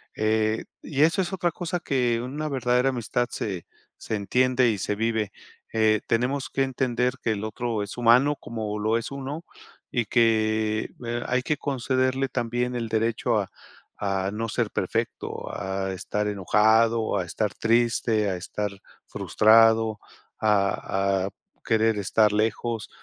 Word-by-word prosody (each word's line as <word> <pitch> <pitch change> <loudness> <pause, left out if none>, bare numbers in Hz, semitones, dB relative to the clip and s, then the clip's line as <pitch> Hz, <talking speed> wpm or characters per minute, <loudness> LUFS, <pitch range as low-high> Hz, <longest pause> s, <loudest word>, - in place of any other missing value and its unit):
eh, 110 0 +1 0.2
y 140 -2 -2
eso 165 +5 +3
es 175 - -3
otra 175 -2 0
cosa 175 +1 -3
que 125 -7 0
una 145 +6 -4
verdadera 125 -1 +2
amistad 120 -1 -1
se 95 -6 -4 0.3
se 110 - -4
entiende 125 +5 +2
y 105 -3 -1
se 105 - -1
vive, 110 -1 -1 0.4
eh, 110 -1 +3
tenemos 125 +4 0
que 135 - 0
entender 125 -2 0
que 115 - 0
el 105 0 -5
otro 110 0 -2
es 100 - -8
humano 125 +5 +5
como 110 -5 -5
lo 110 +2 +1
es 115 - -5
uno 140 +4 -5 0.5
y 120 -2 0
que 110 -1 +2 0.2
eh, 120 +1 -2
hay 125 +1 +1
que 150 +3 0
concederle 130 -1 0
también 120 +1 -1
el 115 -2 -3
derecho 110 +1 +1
a - - -3 0.5
a 95 -1 -1
no 115 +2 -3
ser - - 0
perfecto, - - -3
a 95 0 -3
estar 105 +3 -2
enojado, 110 +3 +3
a 95 - -1
estar 105 +4 -2
triste, 115 -2 +2
a 95 - -1
estar 105 +3 -3 0.4
frustrado, 110 0 +4 0.4
a 100 -2 +1
a - - -4 0.3
querer 110 -1 +2
estar 105 +1 +2
lejos, 110 0 -1
115 Hz, 150 wpm, -25 LUFS, 105-125 Hz, 0.5 s, humano